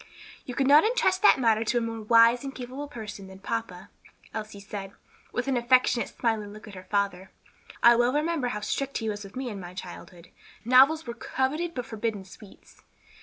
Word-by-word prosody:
"You 250 - -6
could 270 - +1
not 290 +3 +7
intrust 435 -5 +1
that 415 - +6
matter 225 -3 +3
to 235 +2 0
a - - +4
more 230 -1 -4
wise 230 +3 +5
and 275 -1 -6
capable 260 +3 -7
person 215 -7 -8
than 190 0 -12
papa," 195 -2 -5 0.4
Elsie 215 -2 -6
said, 200 -1 -8 0.4
with 245 +1 -3
an 270 - +1
affectionate, 250 0 +3
smiling 220 -4 -2
look 215 +1 -12
at 210 - -11
her 185 -1 -11
father. 195 -2 -1 0.5
"I 235 0 +8
well 240 +1 +3
remember 300 -1 0
how 210 -3 -4
strict 275 +6 -2
he 225 -2 -3
was 205 0 -5
with 195 +3 -12
me 260 0 -4
in 205 -3 -6
my 180 0 -9
childhood; 175 -1 -10 0.4
novels 270 +6 +5
were 235 - -5
coveted 295 +8 -2
but 250 - -4
forbidden 220 -3 -4
sweets." 195 +1 -16
230 Hz, 195 wpm, -27 LUFS, 205-260 Hz, 0.5 s, I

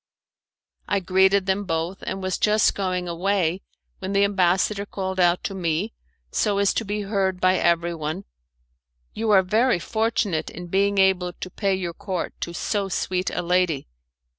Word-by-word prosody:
I 200 - +1
greeted 190 +1 +3
them 195 +1 0
both, 165 +2 -2
and 190 - -3
was 185 0 -1
just 215 0 +3
going 185 -2 -2
away, 180 0 0 0.4
when 190 +1 -4
the 200 0 +4
ambassador 200 +1 +2
called 190 -2 -4
out 175 0 +3
to - - -3
me, 180 +3 -1 0.4
so 205 -2 +1
as 200 -1 +3
to - - -1
be 210 0 -3
heard 195 -2 -1
by 185 0 +3
everyone, 170 0 0 0.9
'You 225 0 -2
are 195 -2 +6
very 225 +5 +2
fortunate 215 -3 -1
in 175 - -8
being 200 +2 +2
able 190 -2 +3
to 185 - -7
pay 195 0 0
your 175 -2 -4
court 185 +1 -4
to 170 - -3
so 195 +3 -2
sweet 185 0 -1
a - - -3
lady. 175 - +1
190 Hz, 165 wpm, -24 LUFS, 180-200 Hz, 0.9 s, are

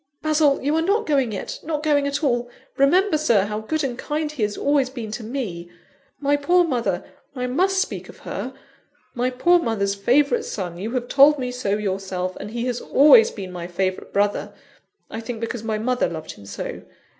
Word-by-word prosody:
Basil! 305 -2 +3
you 290 +3 +1
are 320 - +2
not 405 +6 +1
going 275 -6 +1
yet 195 - -5
not 300 -1 -3
going 290 -2 +2
at 280 +3 -2
all! 240 -3 +1 0.3
Remember, 315 +5 +3
Sir, 230 -10 +3
how 210 +1 -3
good 310 +8 -2
and 250 -3 -3
kind 300 0 -2
he 300 -6 -7
has 210 -1 0
always 280 -2 +2
been 235 -5 -6
to 220 +2 -5
me. 215 -8 -5 0.5
My 285 0 +2
poor 350 +5 +3
mother, 230 - -1 0.3
(I 250 -1 -2
must 375 +10 +1
speak - - -3
of - - -12
her), - - -4 0.6
my 250 0 0
poor 345 +8 +3
mother's 210 -8 0
favourite 280 - +2
son 180 -4 -5
you 210 +4 -3
have 245 -1 -2
told 290 +3 +6
me 250 -2 -3
so 210 -5 -1
yourself! 190 -2 -3
and - - -7
he 235 +2 -3
has 245 -1 -2
always 450 - +6
been 190 - -7
my 175 -1 -6
favourite 185 +1 -2
brother; 205 0 0 0.6
I 225 - -5
think 230 0 -6
because 230 0 -4
my 220 -1 -2
mother 250 +3 0
loved 160 -2 -6
him 100 - -14
so! 100 - -6
250 Hz, 200 wpm, -22 LUFS, 205-295 Hz, 0.6 s, told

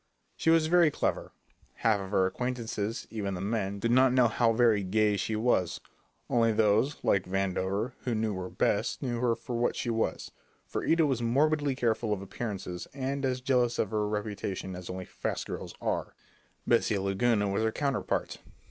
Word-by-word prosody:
She - - 0
was 165 -1 +5
very 170 0 +5
clever; - - -2 0.4
half 110 -3 +2
of 95 -1 -6
her 95 -2 +3
acquaintances, 115 0 -3
even 100 -3 -3
the - - -5
men, 100 0 -2
did 115 +4 0
not 130 +1 +5
know 125 -2 +5
how 115 +1 +2
very 115 -3 +3
"gay" 105 +2 +2
she 105 +3 -2
was. 105 -6 +1 0.5
Only 115 -1 +3
those 110 +6 +2
like 95 -2 +2
Vandover 95 +4 -1
who 120 -3 -1
knew 110 -1 0
her 90 0 -5
best, - - 0
knew 120 -3 -2
her 120 -1 +2
for 125 0 -6
what 120 - +1
she 120 - -2
was, 115 0 -2 0.3
for - - -4
Ida 165 -1 +3
was 130 -5 0
morbidly 145 +4 +2
careful 115 -3 0
of 100 - -4
appearances, 95 -4 -5
and 135 +1 -2
as 130 -1 0
jealous 125 -2 +2
of 105 - 0
her 105 -1 0
reputation 105 -3 -4
as 90 -1 -8
only 90 0 -5
fast - - -4
girls - - -6
are. - - -2 0.5
Bessie 115 -3 +2
Laguna 100 +2 +1
was 100 +2 0
her 110 0 +1
counterpart. 140 +1 -2
110 Hz, 180 wpm, -29 LUFS, 100-125 Hz, 0.5 s, was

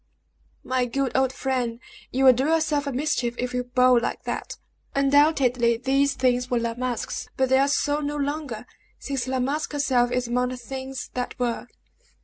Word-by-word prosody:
"My 255 -1 0
good 270 +2 -2
old 265 -1 +3
friend, 250 -3 -2 0.3
you 265 +1 +1
will 260 - +9
do 260 +3 0
yourself 310 -2 +1
a - - -1
mischief 250 -3 -1
if 250 0 -3
you 250 0 0
bawl 250 0 +4
like 235 - -3
that. - - -4 0.4
Undoubtedly 275 -4 +3
these 270 +3 +1
things 250 -1 +1
were 245 - +1
La 235 0 -1
Masque's, 245 -1 -4
but 265 -1 +2
they 265 0 +5
are 275 - +4
so 290 +1 +1
no 295 0 -3
longer, 285 -5 -3 0.3
since 270 -3 -3
La 260 0 -1
Masque 285 +5 -1
herself 255 -4 +2
is 250 -1 0
among 250 +1 0
the 255 - -5
things 265 +1 -6
that 250 -1 -4
were!" 240 -2 -2
255 Hz, 180 wpm, -25 LUFS, 245-280 Hz, 0.4 s, will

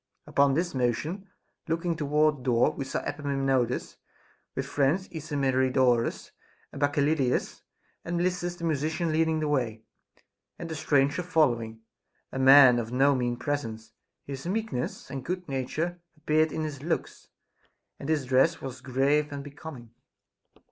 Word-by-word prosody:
Upon 140 -1 +3
this 175 +3 -1
motion, 150 - -2 0.4
looking 165 +1 -1
toward 150 0 +2
the - - -13
door, 120 +3 +3
we 140 -3 -5
saw - - -3
Epaminondas 135 -4 -1 0.6
with - - -2
his - - -12
friends 150 +7 +2
Ismenidorus 130 -5 +1 0.4
and 140 - -9
Bacchyliclas 145 -2 +1 0.4
and 175 +1 -3
Melissus 175 0 -1
the 170 - -10
musician 160 +1 0
leading 160 0 +1
the 155 - 0
way, 120 -6 -1 0.7
and 170 - -7
the 160 - -4
stranger 145 +2 +2
following, 120 -10 +1 0.5
a 135 - -4
man 130 -2 +8
of 115 0 -5
no 135 +3 +4
mean 120 -2 -1
presence; 115 -6 -4 0.3
his 135 +3 -6
meekness 200 - -3
and 135 -2 -5
good 180 +1 -4
nature 155 +6 -3 0.2
appeared 155 +1 +2
in 155 - -3
his 145 -3 -5
looks, 165 +3 -3 0.7
and 140 - -6
his 150 -4 +1
dress 130 +1 +3
was 130 -1 -7
grave 140 +4 +1
and 140 -1 -5
becoming. 140 -4 -10
145 Hz, 140 wpm, -27 LUFS, 130-160 Hz, 0.7 s, man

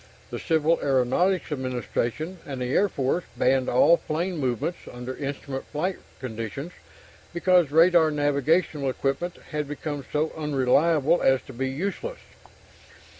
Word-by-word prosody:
The - - -4
Civil 160 +1 +2
Aeronautics 145 +8 +1
Administration 130 +5 -3
and 135 -3 -6
the 125 +1 -2
Air 205 - +3
Force 140 +4 -1
banned 130 0 +2
all 165 +7 +5
plane 170 +3 -3
movements 130 +5 -1
under 125 +1 -6
instrument 140 -1 -5
flight 175 +5 -2 0.2
conditions, 125 - -5 0.6
because 175 -3 +4
radar 165 +1 +5
navigational 145 0 +1
equipment 140 +7 -2
had 150 -2 -2
become 145 -1 -5
so 155 +1 0
unreliable 150 +2 +2
as 135 -1 +3
to - - -11
be 130 +2 -2
useless. 200 - -4
150 Hz, 125 wpm, -25 LUFS, 130-170 Hz, 0.6 s, all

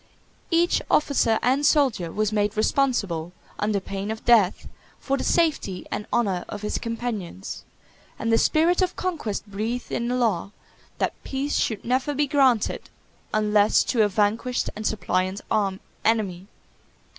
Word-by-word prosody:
Each 340 0 +3
officer 270 -7 +3
and 265 +3 +2
soldier 265 - +2
was 215 +2 0
made 210 0 0
responsible, 200 - 0 0.3
under 210 -1 +1
pain 195 +1 -5
of 220 0 -5
death, 220 -6 +4 0.3
for 275 - -1
the - - -3
safety 305 - +1
and 210 - -4
honor 195 -7 +1
of 205 0 -6
his 210 - -2
companions; 230 - -5 0.5
and 230 0 0
the 225 - +5
spirit 335 +4 +3
of 365 -1 0
conquest 305 - -3
breathed 220 +4 -4
in 235 - -1
the 250 - 0
law, 210 -6 0 0.4
that - - 0
peace 275 +2 -2
should 220 -3 -1
never 260 +4 0
be 295 +1 +2
granted 265 -6 +2 0.4
unless 210 -1 +3
to 235 - +1
a 210 - +5
vanquished 215 +5 0
and 215 0 -2
suppliant 185 -2 -1 0.6
enemy. 200 -5 0
220 Hz, 145 wpm, -24 LUFS, 205-265 Hz, 0.6 s, the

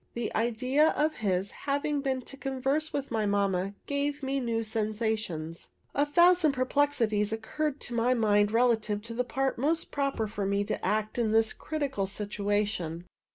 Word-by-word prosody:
The 235 -2 -3
idea 255 +6 +2
of 310 +1 +1
his 195 -2 0
having 285 +1 -1
been 265 -2 -1
to 275 - -11
converse 270 +3 -1
with 280 -2 -3
my 220 -2 0
mamma 200 -1 0
gave 285 0 -2
me 270 +1 0
new 230 -3 -1
sensations. 215 -7 -3 0.2
A 290 +1 +2
thousand 345 -1 +5
perplexities 255 -6 +1
occurred 275 +7 -2
to 240 - -5
my 240 +2 +2
mind 210 -2 +3
relative 225 -3 +2
to 230 +1 -7
the 250 +2 0
part 265 0 -1
most 315 +5 0
proper 275 -5 0
for 205 -1 -4
me 200 +1 +1
to 210 - -4
act 215 +2 0
in 230 -2 +2
this 225 0 +3
critical 280 -10 -2
situation. 205 -4 -2
230 Hz, 160 wpm, -29 LUFS, 210-275 Hz, 0.2 s, thousand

